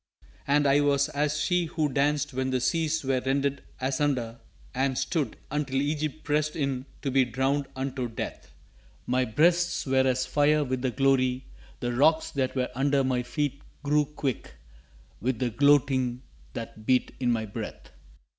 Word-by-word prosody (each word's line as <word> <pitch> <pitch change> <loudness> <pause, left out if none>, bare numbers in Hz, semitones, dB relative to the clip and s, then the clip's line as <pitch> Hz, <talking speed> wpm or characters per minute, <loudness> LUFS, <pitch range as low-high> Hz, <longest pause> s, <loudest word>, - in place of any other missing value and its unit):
And 145 +1 +3
I 140 +1 +5
was 140 -1 +2
as 150 +1 0
she 180 -1 +1
who 155 -1 -1
danced 145 +1 0
when 130 +1 -1
the 130 -1 +1
Seas 160 +4 0
were 130 -1 +1
rended 140 +1 0 0.2
asunder 130 -3 -1 0.3
And 130 0 0
stood, 145 -10 -1
until 140 -2 -1
Egypt 150 +1 -2
pressed 150 0 0
in 135 -3 -2 0.2
to 135 - -1
be 135 0 +4
drowned 135 +4 0
unto 130 -1 -3
death. 115 - -6 0.5
My 125 +1 +1
breasts 170 +8 +2
were 130 -1 +3
as 130 0 +1
fire 150 +1 +3
with 130 -2 -2
the 130 - +1
glory, 130 0 +1 0.4
the 120 0 -1
rocks 155 +6 +3
that 135 -2 -1
were 130 -1 -1
under 140 +1 +2
My 130 -1 +1
feet 140 +2 -2 0.2
grew 150 +1 +3
quick 140 -3 -4 0.7
with 125 +2 0
the 120 0 -1
gloating 130 -1 +3 0.3
that 110 -2 -8
beat 130 -1 +2
in 125 -2 +1
my 110 -2 0
breath. 100 - -7
135 Hz, 160 wpm, -27 LUFS, 130-145 Hz, 0.7 s, I